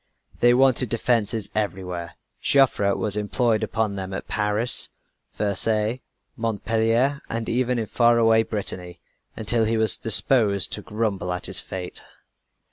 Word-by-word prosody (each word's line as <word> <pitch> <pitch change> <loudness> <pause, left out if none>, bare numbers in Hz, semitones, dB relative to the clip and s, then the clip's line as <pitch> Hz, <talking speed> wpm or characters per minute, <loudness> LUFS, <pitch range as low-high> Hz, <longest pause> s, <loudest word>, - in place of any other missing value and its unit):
They 120 0 +5
wanted 130 -2 +3
defenses 115 -2 0
everywhere. 90 -5 -4 0.3
Joffre 125 -8 +3
was 105 -2 0
employed 110 +2 0
upon 110 -1 -1
them 95 0 -5
at - - -7
Paris, 105 +3 +3 0.5
Versailles, 105 +3 0 0.3
Montpellier, 115 +4 0
and 115 0 -4
even 125 +1 0
in 115 - -2
faraway 115 0 +3
Brittany 90 -5 -4 0.4
until 110 +1 0
he 115 +1 0
was 110 -3 +3
disposed 105 -4 +3
to 105 - -3
grumble 105 -4 -3
at 90 - -2
his - - 0
fate. 90 -1 -6
110 Hz, 125 wpm, -23 LUFS, 100-115 Hz, 0.5 s, They